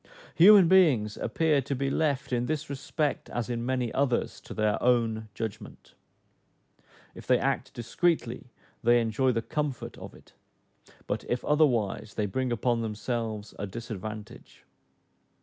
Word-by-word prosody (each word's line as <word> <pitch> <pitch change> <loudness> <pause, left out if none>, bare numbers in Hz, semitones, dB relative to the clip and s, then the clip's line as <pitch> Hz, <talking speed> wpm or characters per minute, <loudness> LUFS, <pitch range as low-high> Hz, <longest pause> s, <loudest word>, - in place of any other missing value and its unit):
Human 195 +1 +8
beings 145 - +4
appear 150 +3 +1
to 140 +1 -3
be 135 +1 -1
left 140 -5 0
in 120 0 0
this 155 -1 -3
respect, 145 +2 -2
as 120 0 -3
in 120 -1 -2
many 125 -2 -1
others, 135 -3 0
to - - -10
their 110 -1 0
own 115 -3 +1
judgment. 110 -1 -7 1.2
If - - -12
they 125 - +5
act 135 0 -1
discreetly, 125 0 -1 0.3
they 120 +1 +4
enjoy 120 +3 +1
the 115 -2 -1
comfort 145 -3 -4
of - - -10
it; - - -19 0.7
but - - -3
if 120 - -1
otherwise, 120 -9 +1
they 105 - 0
bring 125 +6 -2
upon 120 0 0
themselves 110 -1 -4
a 100 - -3
disadvantage. 110 -1 -8
120 Hz, 140 wpm, -28 LUFS, 110-140 Hz, 1.2 s, Human